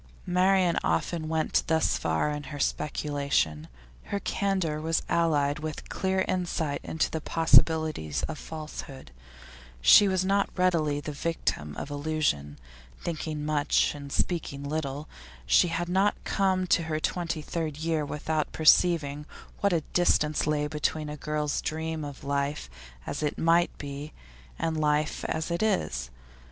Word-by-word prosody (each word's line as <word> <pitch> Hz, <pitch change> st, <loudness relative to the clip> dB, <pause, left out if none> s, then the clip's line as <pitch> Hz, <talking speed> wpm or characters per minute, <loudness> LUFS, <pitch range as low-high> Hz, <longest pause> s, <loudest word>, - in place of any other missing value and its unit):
Marian 180 Hz, -1 st, +3 dB
often 155 Hz, -, -1 dB
went 160 Hz, -1 st, +1 dB
thus 160 Hz, -1 st, +2 dB
far 80 Hz, -, 0 dB
in 150 Hz, -1 st, -5 dB
her 145 Hz, +2 st, -7 dB
speculation. 140 Hz, -, -1 dB, 0.4 s
Her 200 Hz, -, -2 dB
candour 190 Hz, -7 st, -1 dB
was 160 Hz, 0 st, 0 dB
allied 150 Hz, -3 st, +2 dB
with 155 Hz, -1 st, -6 dB
clear 190 Hz, 0 st, 0 dB
insight 170 Hz, -5 st, -1 dB
into 160 Hz, -, -1 dB
the 160 Hz, -, -3 dB
possibilities 160 Hz, -, +3 dB
of 155 Hz, -, -4 dB
falsehood; 150 Hz, -, -8 dB, 0.7 s
she -, -, +8 dB
was 185 Hz, -1 st, +1 dB
not 200 Hz, +1 st, +2 dB
readily 160 Hz, -5 st, +2 dB
the 150 Hz, -, -5 dB
victim 140 Hz, -, -2 dB
of 145 Hz, -, -5 dB
illusion; 145 Hz, -, -1 dB, 0.4 s
thinking 155 Hz, -2 st, -4 dB
much, 150 Hz, -1 st, +2 dB
and 140 Hz, -1 st, -9 dB
speaking 145 Hz, -5 st, -1 dB
little, 145 Hz, 0 st, -3 dB, 0.4 s
she -, -, +5 dB
had 175 Hz, +1 st, -2 dB
not 190 Hz, +3 st, +2 dB
come 190 Hz, -1 st, +1 dB
to 170 Hz, -2 st, +2 dB
her 155 Hz, -1 st, -1 dB
twenty 165 Hz, -1 st, -2 dB
third 155 Hz, -2 st, -3 dB
year 160 Hz, -1 st, 0 dB
without 150 Hz, +1 st, -2 dB
perceiving 155 Hz, -2 st, +3 dB, 0.3 s
what 200 Hz, -, +2 dB
a 170 Hz, -2 st, +2 dB
distance 155 Hz, -4 st, +2 dB
lay 150 Hz, -1 st, +1 dB
between 150 Hz, 0 st, -2 dB
a 150 Hz, -, -5 dB
girl's 150 Hz, 0 st, -2 dB
dream 160 Hz, 0 st, -3 dB
of 145 Hz, -2 st, -8 dB
life 140 Hz, -, -2 dB, 0.3 s
as 145 Hz, -, -4 dB
it 150 Hz, -1 st, -1 dB
might 170 Hz, +1 st, +3 dB
be 145 Hz, +1 st, -7 dB, 0.4 s
and 160 Hz, -1 st, -1 dB
life 150 Hz, 0 st, +1 dB
as 160 Hz, +2 st, -2 dB
it 170 Hz, -, -1 dB
is. 65 Hz, -, 0 dB
155 Hz, 145 wpm, -28 LUFS, 145-170 Hz, 0.7 s, she